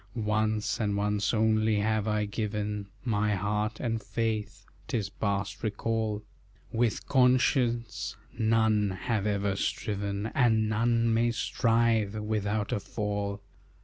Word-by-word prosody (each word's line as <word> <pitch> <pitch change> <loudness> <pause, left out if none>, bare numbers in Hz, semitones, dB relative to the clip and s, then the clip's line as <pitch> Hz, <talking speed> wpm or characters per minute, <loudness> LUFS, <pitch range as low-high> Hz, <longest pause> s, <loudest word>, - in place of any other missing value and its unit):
"Once, 110 -1 0
and 105 -2 0
once 105 0 +1
only, 110 -1 +2
have 110 +1 +1
I 105 -1 +1
given 105 -1 -3 0.2
My 105 -3 +1
heart 105 +3 -1
and 115 -3 -1
faith 110 +1 -3 0.2
'tis 105 -4 -1
past 100 -1 -2
recall; 110 0 -1 0.5
With 115 -1 0
conscience 120 -4 +2 0.2
none 110 -2 +3
have 105 +2 -1
ever 100 -1 0
striven, 100 +1 -2
And 110 -4 +3
none 115 +1 +2
may 115 +1 +3
strive, 115 -3 +1
without 105 -1 -1
a - - 0
fall. 100 -1 -3
110 Hz, 115 wpm, -29 LUFS, 105-115 Hz, 0.5 s, none